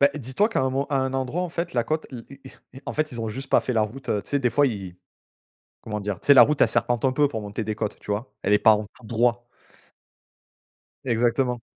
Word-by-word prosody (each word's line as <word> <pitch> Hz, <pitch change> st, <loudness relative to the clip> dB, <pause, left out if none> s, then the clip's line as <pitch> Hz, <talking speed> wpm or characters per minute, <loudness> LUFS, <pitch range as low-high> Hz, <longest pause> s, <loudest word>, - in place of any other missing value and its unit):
Beh, 140 Hz, +1 st, +6 dB
dis 130 Hz, -3 st, -6 dB
toi 210 Hz, +2 st, +3 dB
qu'à 225 Hz, -, 0 dB
un 130 Hz, -, +1 dB
mo 135 Hz, +2 st, -1 dB
à 140 Hz, -, +1 dB
un 130 Hz, 0 st, -1 dB
endroit, 135 Hz, +7 st, -1 dB
en 180 Hz, -, -3 dB
fait, 170 Hz, +1 st, -4 dB
la 120 Hz, -1 st, +1 dB
côte 155 Hz, +3 st, -2 dB
i 120 Hz, -3 st, -8 dB, 0.2 s
i -, -, -9 dB, 0.3 s
i 130 Hz, -, -10 dB
en -, -, -3 dB
fait, 155 Hz, 0 st, -1 dB
ils 120 Hz, -, -5 dB
ont 115 Hz, -, -3 dB
juste 135 Hz, +5 st, -6 dB
pas -, -, +4 dB
fait 125 Hz, -, -3 dB
la 110 Hz, -2 st, +2 dB
route. 125 Hz, +6 st, -6 dB, 0.2 s
Tu -, -, -12 dB
sais, 145 Hz, -, +2 dB
des 125 Hz, -3 st, +1 dB
fois, 145 Hz, +5 st, +3 dB
ils 95 Hz, -7 st, -5 dB, 0.9 s
comment 105 Hz, -1 st, -4 dB
dire, 100 Hz, -2 st, -4 dB
tu -, -, -11 dB
sais, 140 Hz, -, +9 dB
la 130 Hz, -, +9 dB
route 150 Hz, -1 st, +3 dB
elle -, -, +6 dB
serpente 120 Hz, +1 st, 0 dB
un 130 Hz, -, +3 dB
peu 145 Hz, +2 st, +3 dB
pour 115 Hz, -6 st, -5 dB
monter 105 Hz, +2 st, -5 dB
des 110 Hz, 0 st, -3 dB
côtes, 105 Hz, -1 st, -4 dB
tu 105 Hz, -, -6 dB
vois? 110 Hz, +5 st, -4 dB
Elle 100 Hz, -, +1 dB
est 105 Hz, -, +6 dB
pas 110 Hz, -, +6 dB
en 105 Hz, 0 st, -1 dB
tout -, -, -18 dB, 0.2 s
droit. 120 Hz, +2 st, 0 dB, 1.6 s
Exactement. 120 Hz, 0 st, +1 dB
120 Hz, 270 wpm, -24 LUFS, 110-135 Hz, 1.6 s, sais